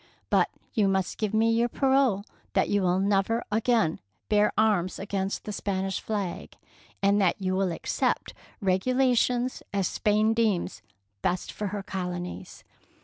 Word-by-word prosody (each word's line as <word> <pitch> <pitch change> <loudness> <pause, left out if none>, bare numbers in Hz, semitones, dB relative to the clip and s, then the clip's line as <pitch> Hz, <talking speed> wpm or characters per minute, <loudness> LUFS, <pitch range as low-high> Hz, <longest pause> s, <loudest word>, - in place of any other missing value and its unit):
But - - +4 0.2
you 215 -5 +3
must 190 -1 0
give 215 -2 0
me 220 +1 +3
your 235 +1 +2
parole 265 -6 +2 0.3
that - - +2
you 205 0 +2
will 180 -1 +2
never 200 +4 +1
again 220 -5 +2 0.3
bear 210 0 +4
arms 200 -5 +2
against 195 -1 -3
the 210 - -5
Spanish 195 -1 -2
flag, 200 -5 -4 0.5
and 200 +1 +4
that 185 -3 +2
you 185 -1 -1
will 190 -1 +1
accept 165 - -1
such - - -24 0.3
regulations 250 +5 +2
as 195 -2 +1
Spain 215 +1 +2
deems 215 - 0 0.4
best 180 -1 -1
for 210 - -4
her 200 0 -4
colonies. 180 -2 -5
205 Hz, 145 wpm, -27 LUFS, 190-225 Hz, 0.5 s, But